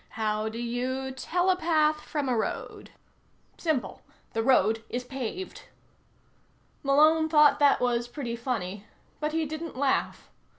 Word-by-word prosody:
How 215 0 0
do 220 - -7
you 250 +3 -2
telepath 320 0 +1
from 295 -3 -3
a 250 - +1
road? 220 - -4 0.7
Simple. 275 - -1 0.3
The 225 - 0
road 225 -3 +3
is 245 +1 -3
paved. 270 +8 -6 1.2
Malone 310 +3 +4
thought 300 -2 +5
that 285 -1 +5
was 240 -1 0
pretty 240 -2 -5
funny, 215 -5 -4 0.3
but 300 0 -1
he 320 0 0
didn't 315 -1 -6
laugh. 275 0 -1
265 Hz, 125 wpm, -27 LUFS, 235-310 Hz, 1.2 s, thought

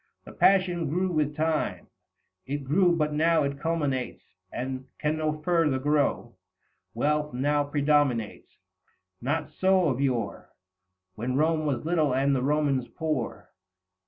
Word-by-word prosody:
The - - -10
passion 180 -5 +2
grew 180 +4 0
with 150 -2 0
time; 160 0 -1 0.6
it 145 +1 -3
grew, 175 +6 +3
but 150 -2 0
now 160 +2 +3
205 140 - 0
It 140 0 -12
culminates, 145 -6 -2 0.3
and 130 +1 -5
can 150 +1 -1
no 155 0 -1
further 165 -5 +2
grow. 145 +1 0 0.6
Wealth 150 -2 0
now 145 +3 +1
predominates; 145 -6 0 0.6
not 145 +5 -2
so 185 -3 +2
of 130 0 -1
yore 125 -6 -2 0.6
When 120 +5 -3
Rome 155 0 +1
was 135 -1 -2
little 155 -6 +1
and 135 +1 +2
the 130 - 0
Romans 140 -2 +1
poor. 150 -1 -4
150 Hz, 135 wpm, -27 LUFS, 135-160 Hz, 0.6 s, grew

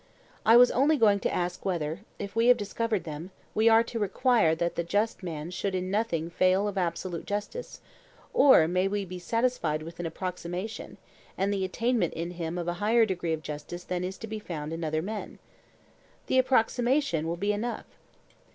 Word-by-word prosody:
I 230 +2 +8
was 245 0 +7
only 290 +4 +3
going 205 -5 +4
to - - -1
ask 175 0 -2
whether, 165 -3 -2 0.2
if 200 +1 -6
we 230 +1 +3
have 250 -1 +7
discovered 215 0 -2
them, 155 +3 -7 0.2
we 220 +1 +4
are 225 +1 +6
to 230 0 -5
require 210 -4 +3
that 170 +1 -1
the 170 - -1
just 205 +7 0
man 165 -2 -5
should 190 +1 -2
in 185 0 -2
nothing 170 -6 -1
fail 185 +3 +3
of 205 - -3
absolute 175 -1 -3
justice; 210 - -5 0.5
or 260 - +6
may 185 +2 +1
we 200 0 -2
be 180 0 -7
satisfied 180 -7 0
with 165 +2 -10
an 175 - -2
approximation, 180 +4 -5 0.4
and 195 +2 +1
the 195 -1 -1
attainment 225 0 0
in 170 +1 -3
him 170 -1 -4
of 175 -1 -3
a 175 - 0
higher 225 +2 +4
degree 180 -5 -2
of 155 -1 -4
justice 150 +4 -6
than 180 0 -3
is 185 +1 -4
to - - -7
be 220 0 -5
found 160 -6 -5
in 165 +1 -4
other 155 0 -1
men? 210 +2 -5 0.9
The 260 - +3
approximation 250 - +2
will 170 +1 -2
be 205 +3 0
enough. 235 +4 -3
190 Hz, 190 wpm, -28 LUFS, 170-225 Hz, 0.9 s, I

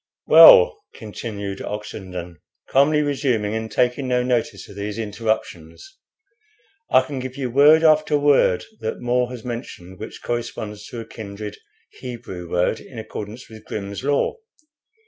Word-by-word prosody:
"Well," 480 -3 +8
continued 105 -2 -6
Oxenden, 90 -4 -7 0.3
calmly 150 +3 +4
resuming, 130 -7 0
and 110 0 -4
taking 125 +2 0
no 125 -1 +1
notice 125 -2 -1
of 100 - -13
these 100 +1 -5
interruptions, 110 - -4 0.9
"I 130 - +6
can 135 0 -6
give 130 0 -6
you 130 -3 -3
word 150 +5 +6
after 155 -1 +4
word 140 -10 +3
that 110 -1 -4
More 125 0 0
has 125 -2 -9
mentioned 105 -7 -7
which 110 - -9
corresponds 110 -3 -5
to 120 - -7
a - - -9
kindred 105 -1 -8 0.4
Hebrew 115 -9 -8
word 90 +5 0
in 125 - -13
accordance 110 +1 -7
with 110 -1 -13
'Grimm's 100 +1 -6
Law.' 145 - 0
115 Hz, 140 wpm, -22 LUFS, 105-130 Hz, 0.9 s, Well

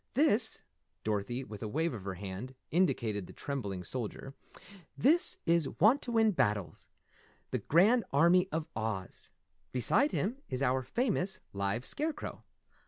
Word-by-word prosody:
This 240 -6 +3 0.2
" - - -49
Dorothy, 110 +4 -1
with 105 -5 -9
a 110 - -3
wave 160 +7 0
of 100 -5 -7
her 95 -1 -3
hand, 100 +7 -7 0.2
indicated 115 - +1
the - - -11
trembling 100 -10 -4
soldier, 130 +4 -5 0.6
"This 330 +7 +3
is 165 -3 +3
Wantowin 225 - +4
Battles, 105 - -1 0.6
the - - 0
Grand 215 - +4
Army 175 +6 +4
of 160 -1 -1
Oz. 110 -4 -4 0.4
Beside 130 - +2
him 225 +7 -1
is 130 +1 -1
our 130 0 +2
famous, 195 - -1
live 100 +5 -1
Scarecrow. 305 0 -3
135 Hz, 135 wpm, -32 LUFS, -, 0.6 s, Wantowin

